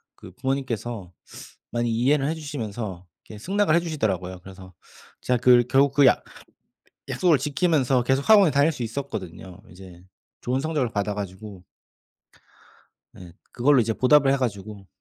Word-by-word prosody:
그 - - -13
부모님께서 120 -7 -4 0.6
많이 120 -1 -1
이해를 135 +5 +1
해 165 - -2
주시면서 110 - -6 0.2
이렇게 105 - -11
승낙을 195 - +1
해 - - +4
주시더라고요. 95 - -3
그래서 95 -1 -13 0.5
제가 125 -1 0
그 120 0 +5
결국 140 0 +3
그 140 -1 +4
약 - - +4 0.9
약속을 170 -6 +2
지키면서 140 -3 +1
계속 135 - -1
학원에 200 -7 +6
다닐 145 +3 +3
수 130 - -6
있었거든요. 105 -8 -7
이제 90 -1 -14 0.4
좋은 130 +2 -1
성적을 150 -6 -2
받아 100 0 -2
가지고 100 -1 -8 1.5
예 90 -2 -13 0.2
그걸로 135 +2 +3
이제 115 -1 0
보답을 135 +2 +4
해 - - +1
가지고 100 -5 -5
120 Hz, 335 characters per minute, -24 LUFS, 100-140 Hz, 1.5 s, 학원에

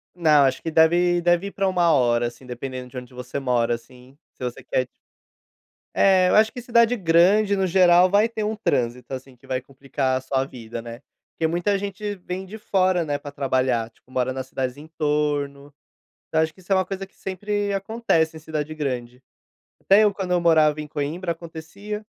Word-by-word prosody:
Não, 155 -4 +5
acho 130 -1 +1
que 165 - -4
deve 175 +2 +4
deve 175 +3 +2
ir - - -7
pra 195 -1 -1
1 175 -3 +3
hora, 120 -4 +3
assim, 125 +2 -11
dependendo 125 0 -6
de 130 - -10
onde 125 0 -9
você 125 +2 -5
mora, 120 -3 +1
assim, 125 +3 -16 0.2
se - - -11
você 125 -1 -5
quer, 130 - 0
tip - - -29 1.1
É, 185 -2 +4
eu - - +3
acho 220 +1 +5
que 245 - -7
cidade 235 0 +3
grande, 195 +3 +4
no 190 -1 +1
geral, 180 0 +5
vai 210 +4 +3
ter 220 -2 -4
um 215 +1 -1
trânsito, 125 - -1
assim, 130 0 -8
que 120 - -21
vai 130 -1 -1
complicar 135 0 -2
a - - -5
sua 135 0 -1
vida, 115 -3 -8
né. 120 +2 -9 0.3
Porque 160 - 0
muita 175 +5 0
gente 205 +1 -4
vem 185 +1 -6
de 215 +4 -9
fora, 185 -4 +1
né, 145 -2 -2
pra 145 - -9
trabalhar, 130 -4 0
tipo, 125 +3 -28
mora 130 0 0
nas 130 0 -5
cidades 130 0 -3
entorno. 145 -2 -2 0.6
Então, 160 - +1
acho 160 0 0
que 185 - -19
isso 190 +2 -4
é - - +6
uma 185 - +2
coisa 195 0 -5
que - - -32
sempre 205 +2 -3
acontece 195 -6 0
em - - -9
cidade 155 0 -4
grande. 125 -4 -4 0.6
Até 205 +2 +5
eu 205 - +3
quando 190 -2 -4
eu 175 - +3
morava 155 -3 +4
em 150 - -6
Coimbra 155 +5 -3
acontecia, 170 +6 -8
160 Hz, 205 wpm, -23 LUFS, 130-190 Hz, 1.1 s, é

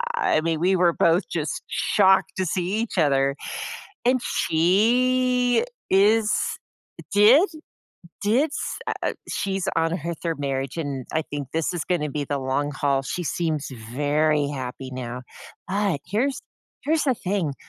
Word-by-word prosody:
I 425 - +2
mean, 160 0 -1
we 185 +2 +3
were 175 -1 +4
both 170 +3 +2
just 155 -3 -3
shocked 190 -2 +3
to 190 - 0
see 185 +4 -1
each 230 - -6
other, 140 -4 +3 0.7
and 255 0 +3
she 245 - +2 0.3
is 210 +3 +4 0.8
did? 230 - +7 0.8
did 245 +9 +2
s - - -4
uh - - 0 0.2
eh - - -1 0.2
she's 195 -1 -2
on 165 +1 +1
her 170 0 -4
3rd 165 0 -4
marriage, 135 -1 -2
and 140 -6 -4
I 160 - +2
think 145 -3 -6
this 165 +1 0
is 170 - -2
gonna 150 -5 -1
be 145 +1 -2
the 140 0 -2
long 135 +2 -1
haul, 140 -1 0
she 175 +6 -4
seems 155 -3 -1 0.2
very 145 +2 +2
happy 130 -1 -6
now. 125 -1 -5 0.5
But 195 -5 0
here's 245 +9 0 0.4
here's 315 +2 +2
the 265 -3 +2
thing, 185 - -2
170 Hz, 150 wpm, -24 LUFS, 145-205 Hz, 0.8 s, did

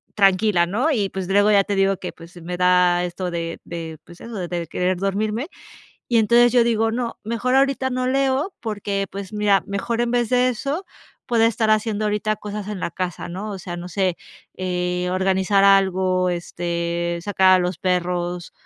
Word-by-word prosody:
tranquila, 195 -2 +3
¿no? 220 - 0
Y, 210 -8 0
pues, 190 -1 -5
luego 205 +2 +4
ya 200 -1 +5
te 205 - -2
digo 195 0 +2
que, 180 - -6
pues, 175 +2 -14
me 175 +2 -5
da 180 -1 +3
esto 180 +1 -4
de 170 -1 -4
de, 165 -2 -7
pues 175 0 -15
eso, 235 - -9
de 175 -3 -3
querer 180 +3 -1
dormirme. 210 - -1 0.6
Y 235 - +3
entonces 235 +2 +5
yo 245 -2 +5
digo: 225 -1 +1
"No, 235 0 -3
mejor 235 +4 -1
ahorita 270 -1 +2
no 255 0 -1
leo", 270 +6 +1
porque, 200 -3 -3
pues 195 0 -7
mira, 205 -3 +2
mejor, 210 +4 -2
en 240 0 0
vez 240 -1 +1
de 250 0 +3
eso, 280 - -3 0.4
puedo 230 -2 +3
estar 225 -1 +2
haciendo 215 0 +1
ahorita 210 +1 0
cosas 210 -1 -6
en 210 -3 -5
la - - -2
casa, 180 0 -4
¿no? 190 +5 -5
O 195 - -6
sea, 175 0 -6
no 175 +1 -7
sé, 185 -1 0 0.4
eh, 180 -1 -2
organizar 190 +1 +2
algo, 190 -2 +3
este, 170 0 -2
sacar 190 -1 +4
a - - +5
los 180 -1 -2
perros, 180 -1 -2
195 Hz, 185 wpm, -22 LUFS, 180-225 Hz, 0.6 s, ya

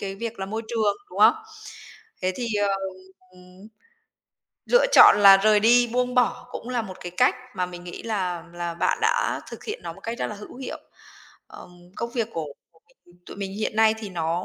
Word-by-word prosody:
cái 195 -1 -5
việc 230 +2 -6
là 190 - -4
môi 220 +3 -4
trường, 220 -3 0
đúng - - -9
không? - - +7 0.9
Thế 185 0 0
thì, 245 - -3 0.2
ờ, 200 - +2 0.6
ừm, 180 +3 -16 1.0
lựa - - +4
chọn - - +9
là 195 -1 +9
rời 210 +1 +3
đi, 240 +2 +5
buông 250 0 0
bỏ 250 0 +1
cũng 240 - -7
là 245 -2 -1
một 190 -3 -9
cái 175 - -7
cách 250 - +4 0.2
mà 180 - -1
mình 175 0 -10
nghĩ 175 - -8
là 185 -6 -3
là 175 -1 -4
bạn 170 - 0
đã 480 -1 +1
thực - - -10
hiện 435 +3 -5
nó - - -6
một - - -16
cách 230 +1 -6
rất - - -1
là 210 - -6
hữu 210 +4 -11
hiệu. 265 - -7 0.7
Ờm, - - -13 0.3
công 235 0 -4
việc 235 -3 -2
của 165 - -3
của 145 - -15 0.3
mình, 175 - -22
tụi - - -10
mình 195 -1 -5
hiện 215 0 -3
nay 220 0 +4
thì 215 - -7
nó 170 -1 -2
210 Hz, 210 wpm, -24 LUFS, 180-235 Hz, 1.0 s, chọn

